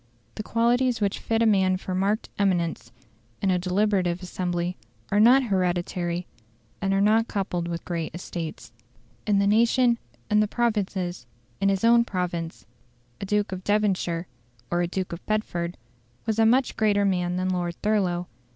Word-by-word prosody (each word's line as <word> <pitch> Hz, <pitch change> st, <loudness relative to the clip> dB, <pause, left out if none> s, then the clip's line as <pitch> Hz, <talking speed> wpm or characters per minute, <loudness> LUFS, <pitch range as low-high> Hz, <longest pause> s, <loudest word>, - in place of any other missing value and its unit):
The -, -, -5 dB
qualities 240 Hz, +2 st, +1 dB
which 200 Hz, -1 st, 0 dB
fit 225 Hz, 0 st, 0 dB
a -, -, +3 dB
man 190 Hz, -3 st, +3 dB
for 185 Hz, 0 st, -5 dB
marked 200 Hz, +4 st, 0 dB
eminence, 175 Hz, -10 st, 0 dB, 0.5 s
in 195 Hz, -, +1 dB
a 180 Hz, -, +2 dB
deliberative 185 Hz, -1 st, 0 dB
assembly, 180 Hz, -1 st, -2 dB, 0.4 s
are 205 Hz, -, +3 dB
not 250 Hz, +5 st, +6 dB
hereditary, 180 Hz, -3 st, -1 dB, 0.6 s
and 195 Hz, -1 st, 0 dB
are 195 Hz, -, +2 dB
not 220 Hz, +3 st, +3 dB
coupled 180 Hz, -4 st, -2 dB
with 170 Hz, -1 st, -5 dB
great 165 Hz, -2 st, -3 dB
estates. 170 Hz, -2 st, -6 dB, 0.6 s
In 205 Hz, -1 st, +3 dB
the 200 Hz, -, +3 dB
nation, 235 Hz, +3 st, +3 dB, 0.3 s
in 210 Hz, -, +3 dB
the 215 Hz, -, +3 dB
provinces, 195 Hz, -, -1 dB, 0.3 s
in 195 Hz, 0 st, +2 dB
his 195 Hz, 0 st, 0 dB
own 235 Hz, +1 st, +6 dB
province, 175 Hz, -5 st, -4 dB, 0.6 s
a 195 Hz, -, -4 dB
Duke 210 Hz, 0 st, 0 dB
of 185 Hz, 0 st, -5 dB
Devonshire, 190 Hz, -5 st, 0 dB, 0.5 s
or 175 Hz, 0 st, +1 dB
a 175 Hz, -, +1 dB
Duke 185 Hz, 0 st, -3 dB
of 170 Hz, -, -8 dB
Bedford, 175 Hz, -5 st, -2 dB, 0.5 s
was 220 Hz, 0 st, 0 dB
a 225 Hz, -, +5 dB
much 255 Hz, +3 st, +2 dB
greater 205 Hz, -2 st, +2 dB
man 180 Hz, -2 st, 0 dB
than 185 Hz, +1 st, -1 dB
Lord 175 Hz, -2 st, -1 dB
Thurlow. 185 Hz, -5 st, +1 dB
195 Hz, 160 wpm, -25 LUFS, 175-215 Hz, 0.6 s, not